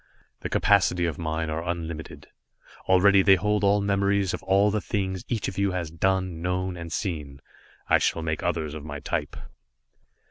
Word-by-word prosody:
The -, -, -5 dB
capacity 90 Hz, -3 st, +3 dB
of 85 Hz, -1 st, -3 dB
mine 80 Hz, -1 st, -2 dB
are 80 Hz, +1 st, -3 dB
unlimited. 85 Hz, -2 st, -5 dB, 0.6 s
Already 95 Hz, +1 st, +6 dB
they 95 Hz, 0 st, +6 dB
hold 105 Hz, +2 st, 0 dB
all 100 Hz, +1 st, +3 dB
memories 100 Hz, -1 st, +1 dB
of -, -, -4 dB
all 100 Hz, +2 st, +3 dB
the 105 Hz, 0 st, -1 dB
things 95 Hz, -4 st, -3 dB
each 115 Hz, -4 st, -2 dB
of 95 Hz, -, -5 dB
you 100 Hz, -2 st, +1 dB
has 85 Hz, -4 st, -3 dB
done, 95 Hz, 0 st, -1 dB
known 90 Hz, +1 st, -2 dB
and 85 Hz, -1 st, -8 dB
seen. 75 Hz, -7 st, -4 dB, 0.5 s
I -, -, +4 dB
shall 80 Hz, -, 0 dB
make 80 Hz, -1 st, -2 dB
others 75 Hz, -2 st, -2 dB
of 80 Hz, -2 st, -7 dB
my 75 Hz, -1 st, -6 dB
type." -, -, -3 dB
90 Hz, 175 wpm, -26 LUFS, 80-100 Hz, 0.6 s, Already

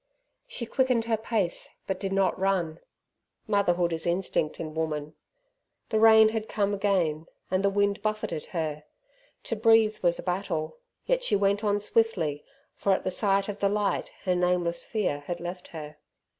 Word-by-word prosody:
She 250 Hz, -, -4 dB
quickened 250 Hz, -1 st, +1 dB
her 230 Hz, -1 st, +2 dB
pace, 220 Hz, -5 st, -2 dB, 0.2 s
but 190 Hz, -1 st, -3 dB
did 195 Hz, -1 st, -3 dB
not 195 Hz, -1 st, +1 dB
run 180 Hz, -4 st, 0 dB, 0.7 s
motherhood 180 Hz, -5 st, +2 dB
is 160 Hz, +1 st, -3 dB
instinct 170 Hz, -3 st, 0 dB
in 155 Hz, -1 st, -5 dB
woman. 155 Hz, -1 st, -3 dB, 0.8 s
The 220 Hz, -, +1 dB
rain 220 Hz, 0 st, +7 dB
had 220 Hz, 0 st, -3 dB
come 205 Hz, -1 st, 0 dB
again, 180 Hz, -6 st, 0 dB, 0.2 s
and 185 Hz, +1 st, +1 dB
the 200 Hz, -, +4 dB
wind 200 Hz, 0 st, +1 dB
buffeted 215 Hz, -7 st, -2 dB
her. 155 Hz, -3 st, -4 dB, 0.6 s
To 230 Hz, -, -2 dB
breathe 225 Hz, -1 st, +4 dB
was 175 Hz, -1 st, +2 dB
a -, -, -7 dB
battle, 180 Hz, -, -2 dB, 0.3 s
yet -, -, +1 dB
she -, -, +2 dB
went 200 Hz, +1 st, +2 dB
on 205 Hz, -1 st, +2 dB
swiftly, 195 Hz, -9 st, 0 dB, 0.3 s
for 200 Hz, -, +1 dB
at -, -, -1 dB
the 185 Hz, -, -1 dB
sight 195 Hz, 0 st, +1 dB
of 205 Hz, -1 st, -5 dB
the 200 Hz, -, +2 dB
light 205 Hz, 0 st, 0 dB
her 185 Hz, -, +1 dB
nameless 180 Hz, -1 st, +1 dB
fear 200 Hz, -10 st, -1 dB
had 175 Hz, -1 st, -3 dB
left 175 Hz, +1 st, -6 dB
her. 150 Hz, -2 st, -9 dB
195 Hz, 170 wpm, -27 LUFS, 170-215 Hz, 0.8 s, rain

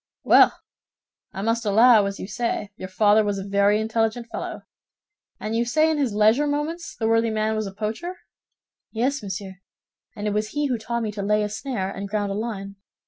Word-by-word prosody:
"Well, -, -, +6 dB, 0.7 s
I 195 Hz, -, -5 dB
must 230 Hz, +2 st, 0 dB
allow, 220 Hz, 0 st, +5 dB
as 200 Hz, 0 st, -5 dB
you -, -, -5 dB
say, 210 Hz, 0 st, -3 dB
your 185 Hz, -, -7 dB
father 210 Hz, +2 st, +4 dB
was 205 Hz, -1 st, -1 dB
a 195 Hz, -, -4 dB
very 200 Hz, +1 st, +3 dB
intelligent 225 Hz, +1 st, -1 dB
fellow. -, -, -5 dB, 0.8 s
And 215 Hz, +1 st, -3 dB
you 230 Hz, -, +2 dB
say 310 Hz, +7 st, +2 dB
in 310 Hz, -, -1 dB
his 270 Hz, -5 st, +1 dB
leisure 215 Hz, +8 st, +3 dB
moments 305 Hz, +4 st, -3 dB
the 220 Hz, -, -1 dB
worthy 225 Hz, 0 st, +3 dB
man 220 Hz, 0 st, 0 dB
was 215 Hz, -1 st, -2 dB
a -, -, -6 dB
poacher?" 220 Hz, -, -4 dB, 0.8 s
"Yes, 260 Hz, +5 st, -1 dB
monsieur, 195 Hz, -1 st, -6 dB, 0.6 s
and 210 Hz, -1 st, -5 dB
it 210 Hz, -, 0 dB
was 210 Hz, +1 st, 0 dB
he 295 Hz, 0 st, 0 dB
who 250 Hz, -4 st, -1 dB
taught 235 Hz, +1 st, -3 dB
me 215 Hz, -, -2 dB
to 205 Hz, -1 st, -5 dB
lay 210 Hz, +1 st, +1 dB
a 210 Hz, -, -2 dB
snare 210 Hz, -3 st, -3 dB
and 200 Hz, 0 st, -6 dB
ground 205 Hz, -1 st, -1 dB
a -, -, -2 dB
line. 200 Hz, -3 st, -5 dB
215 Hz, 200 wpm, -24 LUFS, 205-235 Hz, 0.8 s, Well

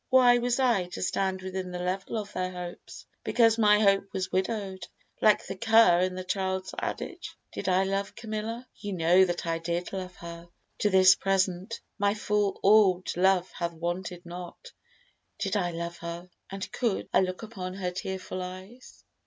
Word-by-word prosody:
Why 245 Hz, -2 st, +6 dB
was 245 Hz, +1 st, 0 dB
I 235 Hz, -9 st, +2 dB
To 175 Hz, -, -7 dB
stand 190 Hz, 0 st, -1 dB
within 190 Hz, -1 st, -4 dB
the 180 Hz, -, -5 dB
level 185 Hz, +5 st, -2 dB
of 210 Hz, -1 st, -5 dB
their 185 Hz, 0 st, -1 dB
hopes, 180 Hz, -1 st, -8 dB, 0.2 s
Because 230 Hz, -1 st, +3 dB
my 210 Hz, -1 st, +5 dB
hope 195 Hz, -1 st, +3 dB
was 185 Hz, 0 st, -2 dB
widow'd, 190 Hz, -1 st, -2 dB, 0.3 s
like 215 Hz, -1 st, +4 dB
the 195 Hz, -, -5 dB
cur 225 Hz, -4 st, +5 dB
In 185 Hz, 0 st, 0 dB
the 185 Hz, -, -4 dB
child's 190 Hz, 0 st, -2 dB
adage? -, -, -5 dB, 0.2 s
Did -, -, -3 dB
I 185 Hz, +1 st, +3 dB
love 195 Hz, +1 st, -2 dB
Camilla? 225 Hz, +2 st, -5 dB
Ye 205 Hz, -2 st, -5 dB
know 175 Hz, +2 st, +5 dB
that 175 Hz, -1 st, -3 dB
I 165 Hz, 0 st, -1 dB
did 170 Hz, +2 st, -3 dB
love 185 Hz, -1 st, -5 dB
her: 170 Hz, 0 st, -10 dB, 0.3 s
to 210 Hz, -, +2 dB
this 185 Hz, -1 st, +7 dB
present 195 Hz, +2 st, -1 dB, 0.2 s
My 200 Hz, +1 st, +2 dB
full 210 Hz, -2 st, 0 dB
orb'd 195 Hz, -3 st, +4 dB
love 185 Hz, 0 st, +3 dB
hath 170 Hz, -1 st, -3 dB
waned 175 Hz, +3 st, -3 dB, 0.2 s
not. 180 Hz, -, -9 dB, 0.7 s
Did 195 Hz, 0 st, -2 dB
I 180 Hz, -4 st, +1 dB
love 170 Hz, 0 st, -5 dB
her, 170 Hz, +2 st, -7 dB, 0.2 s
And 195 Hz, 0 st, -6 dB
could 230 Hz, -6 st, -1 dB
I -, -, +6 dB
look 185 Hz, +2 st, -3 dB
upon 190 Hz, -5 st, -6 dB
her 185 Hz, -2 st, -2 dB
tearful 185 Hz, 0 st, -5 dB
eyes? 185 Hz, +7 st, -10 dB
190 Hz, 175 wpm, -28 LUFS, 180-210 Hz, 0.7 s, this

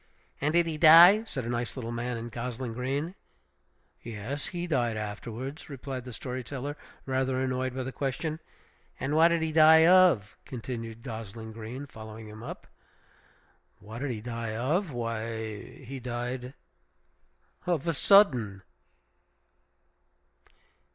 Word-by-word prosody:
"And 150 Hz, +2 st, +1 dB
did 170 Hz, 0 st, +4 dB
he 160 Hz, -2 st, -4 dB
die?" 175 Hz, +7 st, +9 dB
said 135 Hz, -, -4 dB
the -, -, -4 dB
nice 120 Hz, 0 st, -2 dB
little 115 Hz, -2 st, -4 dB
man 120 Hz, +1 st, -3 dB
in 115 Hz, +1 st, -6 dB
gosling 120 Hz, +1 st, -5 dB
green. 135 Hz, +8 st, -2 dB, 0.9 s
"Yes; 115 Hz, +6 st, -4 dB
he 175 Hz, -1 st, -4 dB
died 120 Hz, -9 st, 0 dB
afterwards," 115 Hz, +8 st, -6 dB
replied 135 Hz, -2 st, -6 dB
the 125 Hz, -, -7 dB
story 125 Hz, +2 st, -5 dB
teller, 140 Hz, +3 st, -5 dB, 0.3 s
rather 130 Hz, -1 st, 0 dB
annoyed 130 Hz, -1 st, -1 dB
by 130 Hz, -, -2 dB
the 130 Hz, -, -5 dB
question. 145 Hz, +5 st, -3 dB, 0.6 s
"And 145 Hz, +3 st, -1 dB
what 160 Hz, +1 st, +7 dB
did 170 Hz, -1 st, +1 dB
he 160 Hz, -, -1 dB
die 160 Hz, +1 st, +7 dB
of?" 175 Hz, -, +5 dB
continued 115 Hz, -4 st, -6 dB
gosling 110 Hz, -2 st, -7 dB
green, 115 Hz, +5 st, -7 dB
following 110 Hz, -3 st, -10 dB
him 105 Hz, +1 st, -10 dB
up. 120 Hz, -, -8 dB, 1.1 s
"What 110 Hz, +3 st, -9 dB
did 145 Hz, +1 st, -2 dB
he 115 Hz, -4 st, -4 dB
die 115 Hz, -1 st, -4 dB
of? 155 Hz, -, 0 dB
why, 115 Hz, -3 st, -4 dB, 0.2 s
he 135 Hz, +2 st, -7 dB
died 125 Hz, +1 st, -4 dB, 1.1 s
of 170 Hz, -3 st, 0 dB
a 165 Hz, -, +2 dB
sudden!" 125 Hz, -, +4 dB
125 Hz, 135 wpm, -29 LUFS, 115-145 Hz, 1.1 s, die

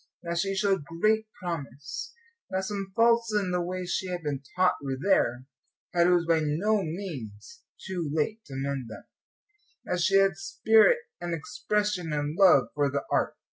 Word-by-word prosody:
That 170 Hz, 0 st, -2 dB
she 195 Hz, +2 st, 0 dB
showed 195 Hz, -4 st, +1 dB
great 215 Hz, +8 st, +1 dB
promise, 155 Hz, -, -6 dB, 0.3 s
that 190 Hz, 0 st, -1 dB
some 195 Hz, -1 st, -4 dB
faults 230 Hz, 0 st, +4 dB
in 200 Hz, -3 st, +1 dB
the 180 Hz, 0 st, 0 dB
way 180 Hz, +1 st, -3 dB
she 185 Hz, +1 st, -2 dB
had 180 Hz, -2 st, -4 dB
been 145 Hz, -3 st, -2 dB
taught 185 Hz, 0 st, +3 dB
were 135 Hz, -2 st, -3 dB
there, 130 Hz, -8 st, +1 dB, 0.5 s
but 175 Hz, 0 st, +4 dB
it -, -, +4 dB
was 175 Hz, -1 st, +3 dB
by 165 Hz, -1 st, +3 dB
no 195 Hz, +8 st, +1 dB
means 150 Hz, -, -7 dB, 0.3 s
too 175 Hz, -5 st, -3 dB
late 185 Hz, +9 st, -1 dB
to 135 Hz, -, -9 dB
mend 135 Hz, -2 st, -3 dB
them, 110 Hz, -, -9 dB, 0.8 s
that 180 Hz, -1 st, -1 dB
she 195 Hz, +3 st, +3 dB
had 195 Hz, -3 st, +3 dB
spirit 220 Hz, -, +4 dB, 0.2 s
and 175 Hz, -1 st, -2 dB
expression 205 Hz, +2 st, -2 dB
and 145 Hz, +1 st, -2 dB
love 165 Hz, -, +6 dB
for 145 Hz, -1 st, +1 dB
the 140 Hz, +1 st, -2 dB
art. -, -, +1 dB
175 Hz, 175 wpm, -27 LUFS, 150-195 Hz, 0.8 s, love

